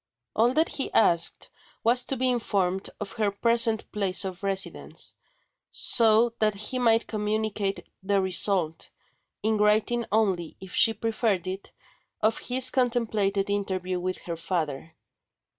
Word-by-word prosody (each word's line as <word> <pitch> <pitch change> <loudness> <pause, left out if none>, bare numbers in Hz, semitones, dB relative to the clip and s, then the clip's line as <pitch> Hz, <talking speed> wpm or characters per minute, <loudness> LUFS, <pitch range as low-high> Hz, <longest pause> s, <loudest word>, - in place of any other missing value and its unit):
All 240 +3 +2
that 320 +1 +2
he 270 - -3
asked 170 -6 +3 0.3
was 245 +2 +3
to 270 - -1
be 255 +1 +1
informed 195 -6 -1
of 205 -1 -6
her 215 -2 0
present 230 +2 +1
place 195 -2 0
of 185 -1 -6
residence, 195 -1 -3 0.6
so 230 0 +4
that 215 -1 +2
he 215 +5 -4
might 230 -2 +3
communicate 210 -2 -2 0.2
the 200 +1 +1
result 185 -3 0 0.5
in 220 0 +1
writing 215 +3 +2
only 190 -6 0
if 190 -1 -11
she 225 - +4
preferred 220 -4 -1
it 190 +1 -6 0.5
of 220 +1 +1
his 255 +1 +3
contemplated 220 -6 0
interview 185 -2 -2
with 185 +1 -3
her 170 - -4
father. 160 -3 -4
210 Hz, 135 wpm, -26 LUFS, 190-225 Hz, 0.6 s, so